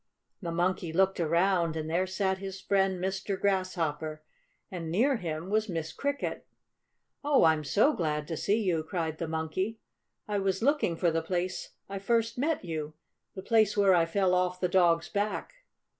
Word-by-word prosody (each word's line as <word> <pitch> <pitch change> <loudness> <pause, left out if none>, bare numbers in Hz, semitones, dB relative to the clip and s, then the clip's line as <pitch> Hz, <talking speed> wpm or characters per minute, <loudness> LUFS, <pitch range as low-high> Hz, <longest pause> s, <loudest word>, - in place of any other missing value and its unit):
The 170 -3 -3
Monkey 175 0 0
looked 190 +3 +2
around, 170 0 +2
and 155 0 -3
there 175 +4 0
sat 190 0 -1
his 195 0 -6
friend 190 -1 +1
Mr. 190 +1 -2
Grasshopper, 165 -6 -1 0.5
and 170 -3 -5
near 245 - +2
him 165 -1 -5
was 215 0 +1
Miss 165 -2 -3
Cricket. 285 0 -3 0.8
"Oh, 290 -1 +4
I'm 160 -2 +4
so 210 - +3
glad 150 - -2
to 165 - -2
see 210 +7 +1
you!" 175 -5 +1
cried 160 -2 -3
the 165 - -2
Monkey. 160 +7 -2 0.5
"I 205 -1 0
was 195 +1 -1
looking 285 - +2
for 170 -1 +2
the 165 0 0
place 180 +2 -3
I 195 0 -5
first 230 +3 0
met 300 - 0
you 155 -2 -4 0.4
the 190 - -7
place 215 -2 +3
where 200 -2 +5
I 170 -2 +3
fell 185 +1 +1
off 180 0 +1
the 180 - +1
dog's 170 -2 +3
back." 205 - -2
185 Hz, 175 wpm, -29 LUFS, 165-200 Hz, 0.8 s, where